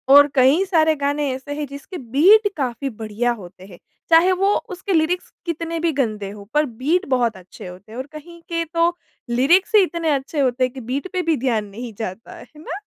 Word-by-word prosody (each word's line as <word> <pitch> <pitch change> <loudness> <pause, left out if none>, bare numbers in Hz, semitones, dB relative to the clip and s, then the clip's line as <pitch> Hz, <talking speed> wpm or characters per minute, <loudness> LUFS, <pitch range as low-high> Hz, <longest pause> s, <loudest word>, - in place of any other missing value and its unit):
और 285 0 +9
कई 270 +7 +5
सारे 320 -4 +3
गाने 285 0 -1
ऐसे 265 +2 -6
हैं, 300 - -2
जिसके 280 +6 -9
बीट 335 - +5
काफ़ी 270 0 -2
बढ़िया 220 +1 -2
होते 185 +1 -13
हैं। 180 -3 -14 0.3
चाहे 335 +3 +6
वो 390 +2 +2 0.2
उसके 370 +2 -4
लिरिक्स 340 +2 0
कितने 335 0 -3
भी 330 0 +1
गंदे 215 -7 -2
हो, 205 0 -10
पर 300 +1 +3
बीट 290 - -1
बहुत 240 -5 +1
अच्छे 185 0 -12
होते 180 +4 -12
हैं 230 - -9
और 260 - -5
कहीं 340 +3 -11
के 335 -1 -1
तो 335 +1 +2 0.3
लिरिक्स 295 - +3
ही 420 - +8
इतने 335 -3 -2
अच्छे 280 +2 -2
होते 255 -2 +1
हैं 255 -1 0
कि 265 - -8
बीट 260 +8 -3
पे 365 - 0
भी 330 -2 +1
ध्यान 230 -4 0
नहीं 225 +3 -8
जाता 215 0 -6
है, - - -11
है 300 +5 -17
ना? 350 +4 -6
280 Hz, 215 wpm, -21 LUFS, 240-335 Hz, 0.3 s, और